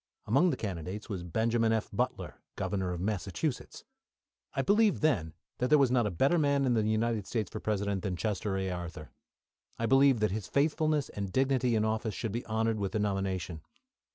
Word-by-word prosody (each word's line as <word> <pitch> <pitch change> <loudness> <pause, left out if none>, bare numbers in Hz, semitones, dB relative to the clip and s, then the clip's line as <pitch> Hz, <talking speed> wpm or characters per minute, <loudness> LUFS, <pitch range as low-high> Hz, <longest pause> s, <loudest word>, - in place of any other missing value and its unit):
Among 140 +12 +4
the 135 - -1
candidates 95 +1 -5
was 95 -4 -3
Benjamin 115 +6 +1
F. 110 -1 0
Butler, 125 +5 -3
Governor 95 -3 -2
of 90 - -4
Massachusetts. 100 - -3 0.7
I - - +1
believed 210 -3 +3
then 90 - +1 0.2
there 130 +5 +4
was 135 -4 +3
not 120 -4 +3
a - - 0
better 135 - +2
man 140 -2 +2
in 125 - +2
the 110 - +2
United 110 -1 0
States 110 -5 -2
for - - -5
President 100 -2 -1
than 95 -2 -2
Chester 100 0 -2
A. 95 -1 -2
Arthur. 85 -3 -6 0.7
I 115 - -1
believed 135 0 +5
that 105 - +2
his 105 -1 -3
faithfulness 155 -1 +1
and 100 -2 -5
dignity 130 -1 +2
in 110 0 +2
office 110 -1 -1
should 115 - -3
be 120 +3 -3
honoured 110 0 0
with 100 -2 -2
the 110 - 0
nomination. 95 -5 -2
110 Hz, 185 wpm, -30 LUFS, 95-130 Hz, 0.7 s, believed